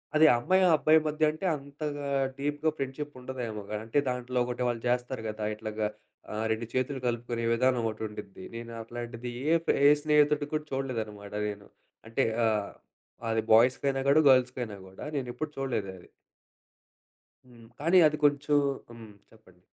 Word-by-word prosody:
అది 155 - +7
అమ్మాయి, 185 +10 +3
అబ్బాయి 155 +1 +5
మధ్య 155 +1 -1
అంటే 155 +5 -6
అంతగా 145 0 -5 0.3
డీప్‌గా 145 +2 0
ఫ్రెండ్షిప్ 140 +2 -4
ఉండదేమోగా. 115 -5 -5
అంటే 115 +6 +1
దాంట్లో 125 0 -2
ఒకటి 125 0 -3
వాళ్ళు 115 -2 -2
చేస్తారు 125 0 -1
గదా! 105 0 -4
ఇట్లాగా 110 -1 -3 0.4
ఆహ్, 110 +1 -2
2 110 +1 -1
చేతులు 130 +1 -1
కలుపుకునే 120 0 -2
విధానం 125 0 +2
ఓటి 110 0 -8
ఉండిద్ది. 100 -3 -10
నేను 115 0 -7
అట్లాంటిది 120 +1 -6 0.2
ఏ - - +6
ఫే - - +4
ఏ - - +9
స్నేహితుడుకి 150 -1 +3
కూడా 155 0 -1
చూడలేదన్నమాట 110 -7 -4
నేను. 105 0 -7 0.4
అంటే 115 +4 0 0.2
ఆహ్, 105 -2 0 0.6
అది 110 0 +1
బాయ్స్‌కి 125 +5 +5
అయినా 135 0 -1
కూడా, 155 +3 +6
గర్ల్స్‌కి 130 -1 +4
అయన 110 -3 -7
కూడా. 95 - -10
నేనెప్పుడు 135 +3 -3
చూడలేదది. 100 -9 -4 1.4
హ్మ్. 120 -2 -16
కానీ, 165 +5 +4
అది 150 0 -2
కొంచెం 145 0 +3 0.4
హ్మ్. 115 -2 -11 0.2
చెప్పండి. 95 -5 -21
125 Hz, 150 wpm, -29 LUFS, 110-145 Hz, 1.4 s, ఏ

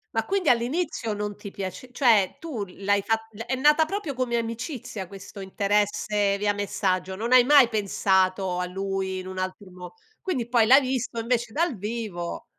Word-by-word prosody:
Ma - - +1
quindi 390 -2 +1
all'inizio 245 -1 0
non 205 0 -4
ti 200 - -9
piace 195 +6 -6
cioè 235 -5 +3
tu 275 -11 -4
l'hai 200 +2 0
fat 225 0 -1
è 260 - -2
nata 300 +4 +4
proprio 330 -6 -4
come 245 -2 0
amicizia, 230 - -5
questo 195 +1 -11
interesse 205 +1 0
via 205 0 +2
messaggio. 190 -2 -1
Non 230 +5 -4
hai 255 -1 +8
mai 275 -3 +6
pensato 190 -3 +1
a 180 - -1
lui 190 0 -3
in 185 - -8
un 185 0 -7
altro 185 +1 -5
mo 180 -1 -11 0.3
quindi 260 -11 -2
poi 235 -2 +3
l'hai 265 +5 +7
visto 255 -3 -2
invece 235 0 -1
dal 330 -4 0
vivo 205 -5 -5
210 Hz, 170 wpm, -25 LUFS, 195-250 Hz, 0.3 s, hai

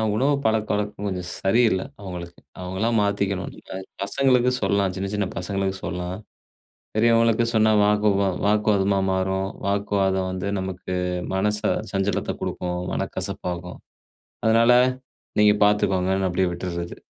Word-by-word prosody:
உணவு 135 +6 +2
பழக்கவழக்கம் 105 -2 -1
கொஞ்சம் 90 -2 -4
சரியில்ல, 100 -1 +2 0.2
அவங்களுக்கு. 90 -3 -7 0.2
அவங்களா 95 +5 -1
மாத்திக்கணும். 100 -2 -1 0.3
அ. - - -3 0.3
பசங்களுக்கு 125 +3 +2
சொல்லலாம். 100 -1 +1
சின்ன, 95 +1 -3
சின்ன 105 -2 0
பசங்களுக்கு 95 +1 -2
சொல்லலாம். 90 +1 -4 0.8
பெரியவங்களுக்கு 115 +1 +4
சொன்னா 110 -1 +4
வாக்கு 105 +1 +3
வா 100 - +2 0.2
வாக்குவாதமா 105 -2 +2
மாறும். 95 +1 0 0.2
வாக்குவாதம் 100 -2 +1
வந்து 95 +1 -3
நமக்கு 95 -1 -4 0.4
மனச 105 +2 0 0.3
சஞ்சலத்த 100 0 -1
குடுக்கும், 90 0 -3
மனக்கசப்பாகும். 90 0 -4 0.7
அதனால 115 +2 +5 0.7
நீங்க 105 0 +6
பார்த்துக்கோங்கன்னு 95 -2 +2
அப்டியே 90 +1 +1
விட்டுர்றது. 85 -1 -5
100 Hz, 110 wpm, -23 LUFS, 95-105 Hz, 0.8 s, நீங்க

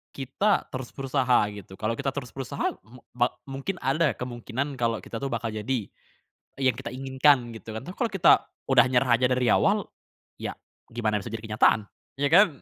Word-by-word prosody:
kita 195 +10 +1
terus 130 -1 -5
berusaha 130 -4 +2
gitu 95 -2 -10
kalau 110 +1 -1
kita 135 -1 0
terus 125 -4 -5
berusaha 135 -2 -2
m 120 +5 -17
ba 120 0 +3 0.2
mungkin 135 +8 -4
ada 140 0 +2
kemungkinan 125 +3 -4
kalau 115 -1 +1
kita 115 - -6
tuh 140 - -1
bakal 115 -2 -2
jadi 115 +4 -1 0.8
yang 130 -2 +2
kita - - -6
inginkan 130 -2 +3
gitu 110 0 -9
kan, 110 - -6
tapi 180 - -6
kalau 240 - +1
kita 195 -3 +6 0.4
udah 135 -1 +6
nyerah 125 -1 +3
aja 125 - +4
dari 125 -1 +2
awal - - +3 0.6
ya - - -4 0.3
gimana 110 -3 0
bisa 120 - -6
jadi 115 0 -5
kenyataan 110 -1 +4 0.3
ya 140 0 +2
kan? 200 +4 +8
125 Hz, 180 wpm, -26 LUFS, 115-135 Hz, 0.8 s, kan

